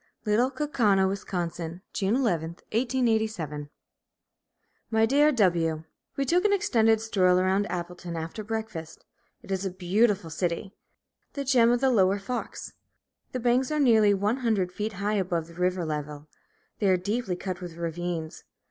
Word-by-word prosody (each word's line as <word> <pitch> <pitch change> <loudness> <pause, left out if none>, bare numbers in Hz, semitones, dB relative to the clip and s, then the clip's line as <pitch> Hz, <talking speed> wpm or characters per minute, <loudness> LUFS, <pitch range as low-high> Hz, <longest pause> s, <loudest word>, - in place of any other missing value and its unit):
LITTLE 220 +5 +3
KAUKAUNA, 225 -10 +2
WIS., 195 0 -3 0.7
June 200 +2 +1
11, 175 - 0 0.2
1887. 220 - 0 1.2
My 220 0 +3
Dear 290 +5 +4
W: 170 - +1 0.3
We 275 - +1
took 350 +6 +2
an 420 - +3
extended 225 - +3
stroll 190 -5 +2
around 190 +2 +2
Appleton 175 -1 -5
after 165 +6 -5
breakfast. 210 -7 -6 0.4
It - - -10
is 190 0 -1
a 195 - -1
beautiful 185 0 +1
city, 175 +4 -2 0.6
the 280 - -3
gem 245 -3 +5
of 245 0 +2
the 265 -1 +4
Lower 195 -4 +3
Fox. 225 +5 -5 0.6
The 255 - -3
banks 245 +2 +2
are 305 0 0
nearly 220 -7 +5
one 205 +5 0
hundred 220 -8 0
feet 210 +3 -3
high 205 +2 -1
above 175 -4 -1
the 170 - -14
river 180 0 0
level. 150 -1 -5 0.5
They 205 - +2
are 185 - +4
deeply 205 +1 -2
cut 185 0 -5
with 175 -2 -8
ravines. 170 -1 -4
200 Hz, 150 wpm, -27 LUFS, 175-230 Hz, 1.2 s, gem